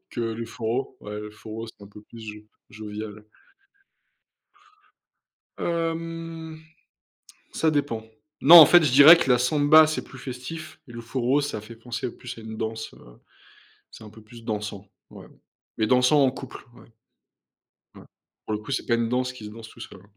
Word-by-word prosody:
que - - -5
le 115 0 -3
forró. 115 +3 -4
Ouais, 105 0 -7
le 105 0 -8
forró 110 +1 -8
c'est 110 - -15
un - - -15
peu 105 +1 -14
plus 115 +2 -14
jo 110 -1 -8 0.4
jovial. 105 0 -7
Ouais. 105 - -15 2.4
Hem. 165 -1 -4 0.9
Ça 160 - +1
dépend. 140 -7 -2 0.4
Non, 170 +5 +9
en 160 - +12
fait, 175 +4 +6
je 150 - +2
dirais 145 +5 +10
que 135 -6 -1
la 125 - +5
samba, 145 +4 +5
c'est 155 - -3
plus 130 - -14
festif 135 +6 -8
et 120 - -11
le 120 - -8
forró, 125 +3 0
ça 145 -7 -4
fait 110 +2 -12
penser 120 +1 -5
plus 125 -1 -9
à - - -9
une 110 0 -8
danse, 110 0 -5
heu, - - -18 0.9
c'est - - -13
un 105 - -11
peu 110 +1 -16
plus 115 +2 -15
dansant. 105 -2 -5 0.2
Ouais, - - -13 0.5
mais 110 - +1
dansant 125 +3 +4
en 130 - +3
couple. 135 -1 -10
Ouais 115 - -19 1.0
ouais. - - -14 0.4
Pour 110 - -2
le - - -2
coup, 110 - -11
c'est 135 - -2
pas 120 - +2
une 115 -1 0
danse 125 +1 -1
qui 125 -4 -12
se 105 - -8
danse 110 +1 -11
tout - - -17
seul. - - -11
120 Hz, 185 wpm, -24 LUFS, 110-145 Hz, 2.4 s, en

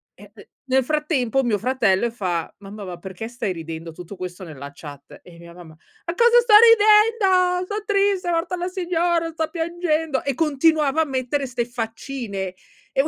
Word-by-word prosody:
E - - -15
p - - -16 0.2
nel 265 0 +2
frattempo 270 -3 0
mio 230 -4 +1
fratello 235 -4 +1
e - - -6
fa: 180 -7 -3
"Mamma, 200 +1 -9
ma 180 -2 -7
perché 190 +3 -7
stai 240 -5 -3
ridendo?" 165 0 -7
Tutto 180 +4 -10
questo 180 0 -7
nella 140 -5 -9
chat, 145 -1 -12
e 170 -2 -15
mia 170 0 -13
mamma: 170 -3 -13 0.3
"A 335 - -2
cosa 475 +4 +5
sto 465 -2 +1
ridendo? 420 -5 +4
Son 415 +1 -4
triste, 400 -3 +1
è - - +1
morta 335 +2 -1
la 355 0 -3
signora, 345 -2 -1
sto 320 -1 -3
piangendo." 325 -4 -1
E 275 -2 -2
continuava 305 0 +2
a - - +1
mettere 270 0 -2
ste 245 -1 -2
faccine 225 -4 -5 0.4
e 270 - +3
qu - - -2
270 Hz, 185 wpm, -22 LUFS, -, 0.4 s, cosa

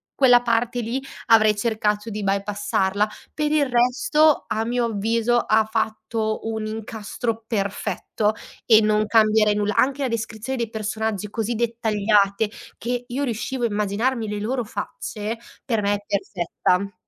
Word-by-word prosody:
quella 245 -3 +6
parte 240 +1 +1
lì 240 +4 -2 0.3
avrei 215 -2 +6
cercato 210 -1 -1
di 210 -1 -4
bypassarla. 200 0 0 0.2
Per 300 -1 -1
il 300 -2 +3
resto, 255 +5 +3
a 220 - -1
mio 240 +1 0
avviso, 230 +2 +1
ha 220 -1 +3
fatto 220 0 -2
un 220 -1 -3
incastro 220 +1 -4
perfetto 210 0 -1 0.3
e 220 -2 +7
non 215 0 +2
cambierei 215 -1 +4
nulla. 210 0 0
Anche 275 +1 +2
la - - +1
descrizione 230 +2 -3
dei 230 -2 -1
personaggi 215 -1 -3
così 225 +1 -2
dettagliate 215 -3 +1 0.3
che 245 0 -3
io 265 +4 -2
riuscivo 240 +1 -3
a - - +3
immaginarmi 215 +3 -1
le 210 - -3
loro 245 +4 -1
facce, 220 0 -5 0.3
per 225 -5 0
me 205 0 +1
è 205 - -7
perfetta. 195 0 -1
220 Hz, 145 wpm, -23 LUFS, 210-235 Hz, 0.3 s, e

